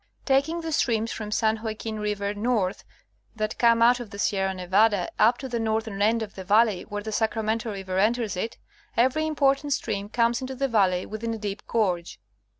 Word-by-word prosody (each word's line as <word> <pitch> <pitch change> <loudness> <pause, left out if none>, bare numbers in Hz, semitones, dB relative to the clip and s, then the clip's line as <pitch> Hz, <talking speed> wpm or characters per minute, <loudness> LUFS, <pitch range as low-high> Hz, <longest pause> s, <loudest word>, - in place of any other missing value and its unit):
Taking 285 +5 +1
the 325 -1 -4
streams 230 -6 +1
from 215 -2 -5
San 220 0 +1
Joaquin 220 -1 -4
river 205 -1 -2
north, 210 -3 -1 0.5
that 215 -1 -3
come 230 -1 +5
out 245 +1 +5
of 240 -3 -7
the 200 - -9
Sierra 195 -2 0
Nevada, 190 +1 +2
up 230 +3 +5
to 265 - -6
the 240 -2 -2
northern 220 -2 -2
end 225 +2 +3
of 205 - -8
the 190 - -8
valley 210 0 +3
where 205 0 -6
the 220 - -5
Sacramento 220 +1 -1
river 190 -2 -3
enters 220 0 +1
it, 225 +6 -4 0.4
every 265 +6 +2
important 285 -1 +2
stream 205 -6 -3
comes 235 +1 +1
into 260 0 -5
the 275 +1 0
valley 190 -6 +2
within 225 +1 -4
a - - -6
deep 205 -1 -5
gorge. 180 -7 -1
220 Hz, 190 wpm, -26 LUFS, 205-235 Hz, 0.5 s, come